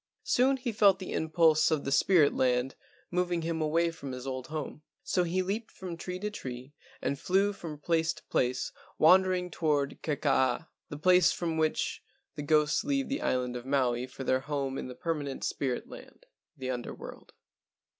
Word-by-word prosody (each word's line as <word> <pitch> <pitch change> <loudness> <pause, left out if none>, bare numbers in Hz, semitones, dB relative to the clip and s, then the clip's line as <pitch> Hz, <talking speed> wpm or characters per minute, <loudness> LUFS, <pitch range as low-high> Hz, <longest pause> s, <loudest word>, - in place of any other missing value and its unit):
Soon 265 +2 +3
he 250 -2 -3
felt 200 -3 +5
the 190 - -6
impulse 160 -1 +3
of 155 -3 0
the 135 - -2
spirit 150 +1 +4
land 125 0 +1 0.4
moving 175 -1 0
him 165 0 -2
away 165 +2 +2
from 140 -5 -7
his 125 0 -7
old 130 -1 -4
home. 150 -1 -5 0.2
So 190 -9 +1
he 180 +2 0
leaped 210 +5 -3
from 180 -3 -7
tree 180 +2 -5
to 210 +3 -4
tree 130 -6 -7 0.3
and 140 - -1
flew 195 +5 +2
from 165 -6 -7
place 160 +2 +1
to - - -15
place 125 +1 0 0.3
wander¬ 185 +3 +6
ing 180 0 -5
toward 145 -4 0
Kekaa, 140 -1 +1 0.2
the 145 - -6
place 180 +2 +5
from 165 -2 -2
which 160 -1 0 0.3
the - - -6
ghosts 150 0 +2
leave 275 -1 0
the 275 - -2
island 125 -1 0
of 125 +1 -6
Maui 125 -3 +1
for 130 +1 -8
their 130 0 +2
home 135 -1 -3
in - - -5
the 125 - -8
permanent 145 -2 -3
spirit 130 -3 -2
land—the 130 -1 -10
Under 125 -1 -5
world. - - -11
155 Hz, 180 wpm, -30 LUFS, 135-180 Hz, 0.4 s, wander¬